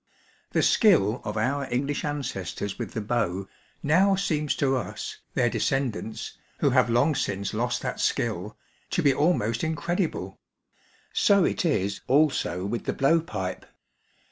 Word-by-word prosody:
The - - +2
skill 130 - +4
of 105 +1 -4
our 130 +4 -1
English 140 +4 -1
ancestors 120 - -4
with - - -5
the 110 - -2
bow 100 -4 -1 0.4
now 185 +7 +4
seems 155 -7 0
to 135 -1 +1
us, 130 - -5 0.2
their - - +3
descendants, 125 -5 -2 0.2
who - - +2
have - - +4
long 120 +7 +3
since 100 -7 -2
lost 120 +3 -1
that - - -3
skill, 105 -2 -1 0.3
to 180 - 0
be 140 -2 +5
almost 130 -7 +1
incredible; 160 - -2 0.7
so 200 -2 +4
it - - 0
is 100 - 0
also 130 - +2
with 115 +4 -3
the - - -1
blow 150 +5 +3
pipe. 95 - -4
130 Hz, 145 wpm, -26 LUFS, 105-155 Hz, 0.7 s, be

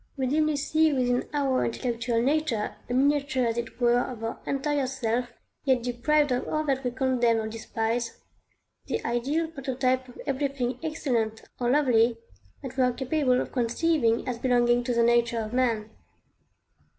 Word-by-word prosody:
We 265 - 0
dimly 305 +3 +2
see 310 +2 +2
within 250 -2 0
our 275 -3 +1
intellectual 235 -1 -1
nature 275 -6 0
a - - -1
miniature 280 -1 +2
as 230 -1 0
it 235 0 -5
were 240 0 +4
of 245 -2 -4
our 225 - -4
entire 280 0 0
self, 245 -2 -2 0.3
yet 260 -4 +2
deprived 270 +4 +1
of 250 - -1
all 310 0 0
that 270 -2 -1
we 250 - 0
condemn 245 -2 +1
or 220 - -3
despise, 225 +1 -3 0.7
the - - -3
ideal 265 +8 0
prototype 260 -3 -1
of 245 - -14
everything 270 -3 -1
excellent 240 -9 -1 0.2
or 240 -1 0
lovely 245 -4 +3 0.5
that 265 0 -7
we 260 - +4
are 250 -1 +2
capable 260 0 +1
of - - -3
conceiving 240 0 +1
as 245 -2 -3
belonging 240 -1 +3
to 245 - 0
the 235 - +4
nature 235 0 +3
of 220 +1 -4
man. 230 -4 0
250 Hz, 165 wpm, -27 LUFS, 235-275 Hz, 0.7 s, were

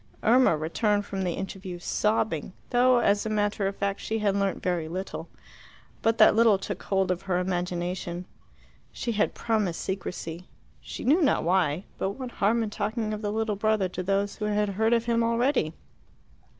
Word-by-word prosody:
Irma 235 -7 +5
returned 205 +6 0
from 195 -1 -4
the 180 -2 -1
interview 190 -1 -6
sobbing, 185 -2 0 0.2
though, 250 +1 +5
as 205 -3 +2
a 220 - -3
matter 205 -1 0
of 195 - -3
fact, 200 0 -2
she 220 - -2
had 205 -2 +1
learnt 200 -1 -1
very 175 -3 0
little. 185 +4 -5 0.7
But 225 0 +2
that 215 - +7
little 225 -3 +5
took 195 0 -5
hold 190 -2 +1
of 180 0 -2
her 185 -2 -1
imagination. 180 0 -2 0.7
She 235 - -3
had 215 -1 0
promised 215 -7 -1
secrecy 180 -2 -5 0.3
she - - -7
knew 310 +8 +4
not 285 - +3
why. 175 -1 +1 0.2
But 195 - -1
what 255 +1 -7
harm 225 +3 +1
in 215 - -4
talking 215 +1 -2
of 210 - -4
the 205 -1 -2
little 220 -1 -1
brother 215 -1 +1
to 185 - -4
those 200 +2 0
who 210 - -3
had 210 0 +1
heard 220 +4 +1
of 230 0 +2
him 235 -1 +2
already? 235 - +1
200 Hz, 180 wpm, -27 LUFS, 185-220 Hz, 0.7 s, that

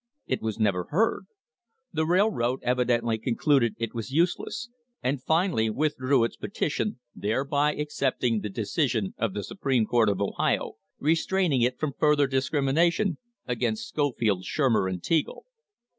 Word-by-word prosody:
It 130 - -2
was 110 -2 -3
never 100 -5 +1
heard; 215 +9 0 0.7
the 160 0 0
railroad 170 - +1
evidently 120 -2 +1
concluded 120 +1 +2
it 115 -1 -3
was 115 +1 -5
useless, 175 - 0 0.4
and 130 +1 0
finally 160 - +1
withdrew 135 -1 +1
its 115 - -1
petition, 180 -1 -2
thereby 140 +7 0
accepting 130 -6 0
the 105 - -4
decision 110 - -1
of 115 -4 -1
the 105 - -3
Supreme 130 - 0
Court 115 -1 +3
of 100 -2 -1
Ohio 100 - -1 0.2
restraining 165 -1 +1
it 125 +1 +1
from 150 -3 -2
further 150 -1 +4
discrimination 145 +7 +1 0.3
against 215 - -2
Scofield, 115 -10 0
Shurmer 115 -7 +1
and 90 -2 -5
Teagle. 160 -3 0
130 Hz, 135 wpm, -27 LUFS, 115-155 Hz, 0.7 s, further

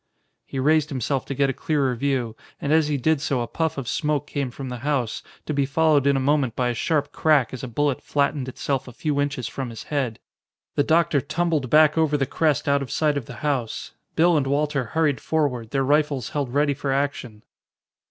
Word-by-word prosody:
He - - -6
raised 155 +3 +3
himself 135 -1 -2
to 140 - -3
get 140 0 +2
a - - -6
clearer 140 -4 0
view, 125 -3 -1 0.2
and 145 - 0
as 160 -1 +4
he 150 -1 0
did 155 +2 +1
so 140 -5 0
a 120 - -3
puff 160 +3 -2
of 135 -4 -4
smoke 150 -1 0
came 140 -3 -3
from 130 +2 -7
the 125 -1 -5
house, 130 -4 -1 0.2
to 155 - -2
be 140 -1 +2
followed 145 0 +3
in 140 -1 +4
a - - +1
moment 135 -3 +1
by 125 -1 +1
a - - 0
sharp 145 +3 0
crack 150 -7 +2
as 130 - -5
a - - -3
bullet 140 +2 0
flattened 140 -2 0
itself 135 +1 -2
a 125 - -9
few 145 +2 -1
inches 140 -4 -2
from 135 -3 -5
his 115 - -8
head. 135 -7 -2 0.6
The - - +2
doctor 160 -1 +3
tumbled 155 -2 -1
back 155 +2 +5
over 150 -2 +2
the 135 - +1
crest 155 +1 0
out 140 0 +3
of 135 - -5
sight 150 -2 +1
of 140 -5 -3
the 125 - -8
house. 130 -6 -2 0.2
Bill 170 0 +4
and 135 -2 0
Walter 145 -1 0
hurried 150 +2 0
forward, 135 -8 -1
their 135 +2 0
rifles 145 -3 +1
held 140 -4 -2
ready 145 +1 +2
for 140 0 -3
action. 135 -6 -2
140 Hz, 220 wpm, -24 LUFS, 130-150 Hz, 0.6 s, back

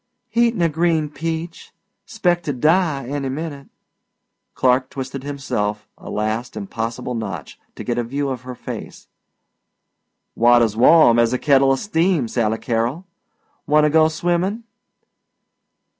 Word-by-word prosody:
"Eatin' 235 -5 +2
a - - +4
green 160 -1 0
peach. 165 +3 -5 0.4
'Spect 175 -6 0
to 145 - -1
die 155 +1 +1
any 140 +1 -3
minute." 140 0 -6 0.9
Clark 130 0 +2
twisted 135 0 -6
himself 105 -7 -3
a - - -11
last 110 +3 -3
impossible 115 +4 -4
notch 110 -5 -6 0.2
to - - -7
get 120 -1 -1
a - - 0
view 140 +4 -2
of 130 -3 -4
her 125 0 -8
face. - - -8 1.3
"Water's 120 -2 +4
warm 120 0 +6
as 115 +1 +3
a - - +1
kettla 135 -1 +3
steam, 165 - +1
Sally 110 -1 0
Carol. 120 +10 -2 0.6
Wanta 150 0 +4
go 160 0 +5
swimmin'?" 175 +7 -1
140 Hz, 130 wpm, -20 LUFS, 120-160 Hz, 1.3 s, warm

